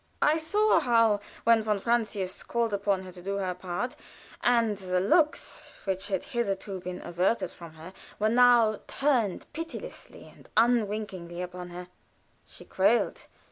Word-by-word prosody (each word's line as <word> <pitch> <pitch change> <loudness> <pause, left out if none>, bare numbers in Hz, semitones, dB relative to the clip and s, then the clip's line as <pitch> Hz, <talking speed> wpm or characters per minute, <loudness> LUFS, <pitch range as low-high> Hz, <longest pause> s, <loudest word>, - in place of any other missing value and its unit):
I 300 +2 +4
saw 410 +7 +3
how, 230 -4 +3 0.2
when 230 -1 +5
von 215 -1 0
Francius 210 -4 -1
called 235 -2 -1
upon 200 -1 0
her 185 - -9
to 180 0 -12
do 195 +2 -3
her 185 -2 -1
part, 180 +7 -4 0.5
and 235 -3 +3
the 185 -2 -1
looks 300 - +1
which 190 0 -2
had 190 -3 -1
hitherto 200 -5 -3
been 180 0 -7
averted 180 +2 0
from 170 -2 -12
her 160 +4 -11 0.2
were 215 - +1
now 235 -2 +5
turned 250 -9 0
pitilessly 330 +2 -7
and - - -18
unwinkingly 210 -7 0
upon 180 0 -7
her, 180 +1 -8 0.6
she - - -13
quailed. 205 +5 +1
205 Hz, 145 wpm, -28 LUFS, 185-235 Hz, 0.6 s, when